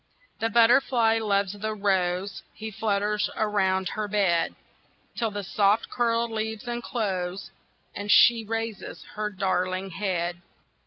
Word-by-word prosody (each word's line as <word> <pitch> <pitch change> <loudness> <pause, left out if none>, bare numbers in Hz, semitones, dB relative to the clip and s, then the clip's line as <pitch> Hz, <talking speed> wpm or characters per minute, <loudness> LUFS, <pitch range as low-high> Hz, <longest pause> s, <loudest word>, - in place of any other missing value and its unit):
THE 225 - 0
butterfly 230 0 +4
loves 200 -3 0
the 215 +1 -4
rose, 190 -1 0
He 220 0 -6
flutters 210 0 0
around 190 -3 +1
her 215 -1 -3
bed, 195 -5 +1 0.6
Till 230 -2 0
the 205 -1 -5
soft 205 +3 +1
curled 235 -1 0
leaves 220 +1 -4
unclose, 200 -6 -3 0.4
And 205 0 -6
she 235 -1 +6
raises 225 -1 -5
her 210 0 -2
darling 185 -1 -1
head. 175 -2 -2
210 Hz, 120 wpm, -26 LUFS, 190-225 Hz, 0.6 s, she